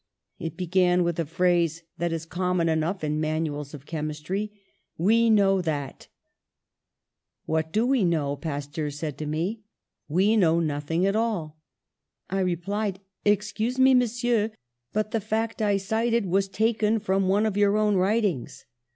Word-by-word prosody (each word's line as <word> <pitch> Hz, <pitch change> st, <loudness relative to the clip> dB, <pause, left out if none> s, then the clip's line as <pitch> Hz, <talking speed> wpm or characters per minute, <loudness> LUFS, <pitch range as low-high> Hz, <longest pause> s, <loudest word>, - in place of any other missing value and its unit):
It 165 Hz, -2 st, -5 dB
began 180 Hz, 0 st, +2 dB
with 170 Hz, -1 st, -1 dB
a 165 Hz, -, -1 dB
phrase 170 Hz, -1 st, +1 dB, 0.2 s
that 170 Hz, 0 st, 0 dB
is 165 Hz, -1 st, -3 dB
common 180 Hz, 0 st, 0 dB
enough 160 Hz, +3 st, 0 dB
in 150 Hz, 0 st, -1 dB
manuals 155 Hz, -2 st, -2 dB
of 140 Hz, -1 st, -12 dB
chemistry: 160 Hz, +7 st, -3 dB, 0.5 s
'We 225 Hz, +7 st, +3 dB
know 195 Hz, -3 st, +4 dB
that.. 145 Hz, -5 st, -4 dB, 0.7 s
.' -, -, -60 dB
'What 160 Hz, 0 st, -1 dB
do 220 Hz, +6 st, +2 dB
we 255 Hz, -4 st, +2 dB
know?' 155 Hz, -5 st, +1 dB
Pasteur 145 Hz, +1 st, -4 dB
said 145 Hz, 0 st, -5 dB
to 155 Hz, -, -4 dB
me, 175 Hz, +9 st, -2 dB, 0.5 s
'We 195 Hz, +8 st, +3 dB
know 170 Hz, -4 st, +4 dB
nothing 160 Hz, +2 st, -1 dB
at 195 Hz, +1 st, +1 dB
all.' 190 Hz, -9 st, -1 dB, 0.7 s
"I 195 Hz, -, 0 dB
replied, 190 Hz, +2 st, -1 dB, 0.3 s
'Excuse 210 Hz, +4 st, +1 dB
me, 260 Hz, 0 st, +6 dB
Monsieur, 240 Hz, -3 st, +2 dB, 0.4 s
but 215 Hz, 0 st, -1 dB
the 225 Hz, -, 0 dB
fact 220 Hz, +2 st, -2 dB
I 205 Hz, -2 st, +2 dB
cited 225 Hz, +3 st, 0 dB
was 195 Hz, +2 st, +1 dB
taken 220 Hz, +1 st, +1 dB
from 195 Hz, -2 st, 0 dB
one 205 Hz, +3 st, +3 dB
of 215 Hz, -3 st, -1 dB
your 205 Hz, 0 st, +3 dB
own 210 Hz, -1 st, +2 dB
writings.' 195 Hz, -, 0 dB
185 Hz, 150 wpm, -26 LUFS, 160-215 Hz, 0.7 s, me